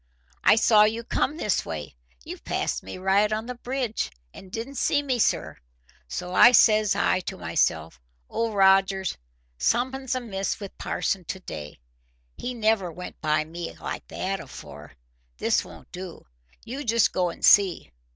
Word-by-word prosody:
"I - - +7
saw 220 -1 +5
you 225 +2 -1
come 285 +5 -1
this 210 - 0
way. 80 -3 -6 0.3
You - - -8
passed - - -2
me 95 - -8
right 195 +3 +2
on 215 +1 -2
the 250 - -5
bridge, 245 -2 -3 0.2
and 190 - -13
didn't 240 +6 -5
see 290 0 +2
me, 260 -4 -1
sir. 80 - 0 0.5
So 180 - +4
says 215 -3 +5
I - - +2
to 185 - -6
myself, 80 -7 -1 0.3
'Old 230 -2 -2
Rogers, 195 -1 +3 0.4
summat's 260 - 0
amiss 200 -6 -3
wi' 200 -2 -6
parson 190 -2 -1
to 190 - -5
day. 75 - -8 0.6
He 250 0 -5
never 215 -5 +1
went 180 +3 -9
by 155 0 +1
me 170 +2 -7
like - - -6
that - - -3
afore. - - -11 0.4
This - - +1
won't - - -14
do. 180 -1 -8 0.4
You 265 +5 -5
just 230 -3 +3
go 180 -1 0
and 170 - -2
see. 190 - +5
200 Hz, 155 wpm, -25 LUFS, 180-230 Hz, 0.6 s, I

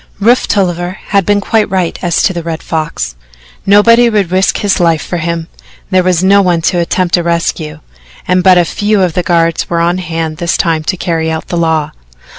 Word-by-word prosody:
Rufe 235 +5 +2
Tolliver 180 -2 -1
had 200 -2 +1
been 205 0 +3
quite 215 0 0
right 185 -3 -2
as 175 -2 0
to 190 - +1
the 170 - -4
Red 165 -1 -5
Fox. 155 - -3 0.5
Nobody 230 +4 +5
would 205 -6 0
risk 185 +1 +1
his 205 -2 0
life 165 -2 +2
for 175 - -3
him 165 0 -3 0.4
there 185 -1 +3
was 180 -1 +1
no 200 +1 +5
one 175 -3 +1
to 175 0 +1
attempt 175 +1 0
a - - 0
rescue, 165 -2 -2 0.5
and 180 0 +2
but 185 -1 +6
a 175 - +3
few 205 +2 0
of 175 -3 0
the 180 - 0
guards 165 -1 0
were 170 - 0
on 175 +2 0
hand 165 -2 -4
this 170 0 -1
time 165 -3 0
to 185 - -1
carry 165 -3 -2
out 160 0 -4
the - - -2
law. 160 -3 0
175 Hz, 210 wpm, -12 LUFS, 165-190 Hz, 0.5 s, but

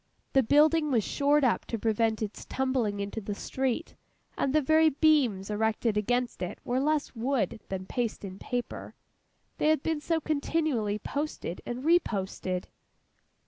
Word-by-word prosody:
The 270 - +6
building 300 +5 +4
was 235 -6 +2
shored 290 +4 +2
up 250 - +2
to 230 - -3
prevent 220 0 +1
its 210 - -6
tumbling 255 -6 -1
into 200 +2 -4
the 205 0 -4
street; 265 +8 -2 0.4
and 270 - 0
the 310 - +4
very 315 +2 +4
beams 265 -10 +2
erected 220 +1 0
against 245 +4 0
it 180 - -3
were 250 +1 0
less 300 +1 0
wood 230 -3 -1
than 190 -1 -4
paste 235 +1 -2
and 190 -1 -7
paper, 245 -1 -4 0.6
they - - +2
had 310 -2 +3
been 320 -2 -1
so 325 +2 0
continually 285 -8 0
posted 280 - -4
and 245 +2 -4
reposted. 195 - 0
245 Hz, 150 wpm, -29 LUFS, 210-295 Hz, 0.6 s, The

